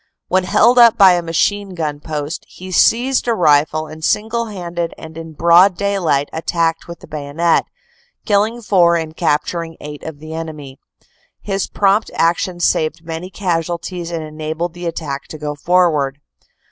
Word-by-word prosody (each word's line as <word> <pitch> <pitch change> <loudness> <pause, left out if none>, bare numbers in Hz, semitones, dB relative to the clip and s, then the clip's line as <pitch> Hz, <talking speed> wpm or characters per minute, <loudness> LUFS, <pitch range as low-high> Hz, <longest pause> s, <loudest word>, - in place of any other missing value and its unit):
When 185 0 +2
held 240 +6 +4
up 235 -2 +7
by 195 -2 +8
a 175 - +1
machine 190 +4 -1
gun 150 -3 -3
post, 150 +1 -5
he 185 +1 -10
seized 245 +8 +3
a 235 - +2
rifle, 155 -2 +3
and 155 +1 -11
single 225 +6 0
handed 175 -5 -5
and 160 0 -11
in 165 -1 -8
broad 170 +4 +5
daylight 185 -8 0
attacked 165 0 -1
with 170 0 -9
the - - -13
bayonet, 155 +3 0 0.6
killing 220 +3 +1
four 175 -5 +4
and 160 -1 -3
capturing 165 +1 -1
eight 150 0 -8
of 160 -2 -7
the 155 +2 -9
enemy. 150 -5 -7 0.6
His 195 -1 -2
prompt 200 +2 +1
action 175 +1 0
saved 160 -1 0
many 165 +2 -6
casualties 175 -2 -3
and 165 -2 -4
enabled 155 +2 -4
the 175 0 -6
attack 150 -4 -5
to 155 - -8
go 150 -1 -4
forward. 150 -4 +1
170 Hz, 160 wpm, -18 LUFS, 155-185 Hz, 0.6 s, by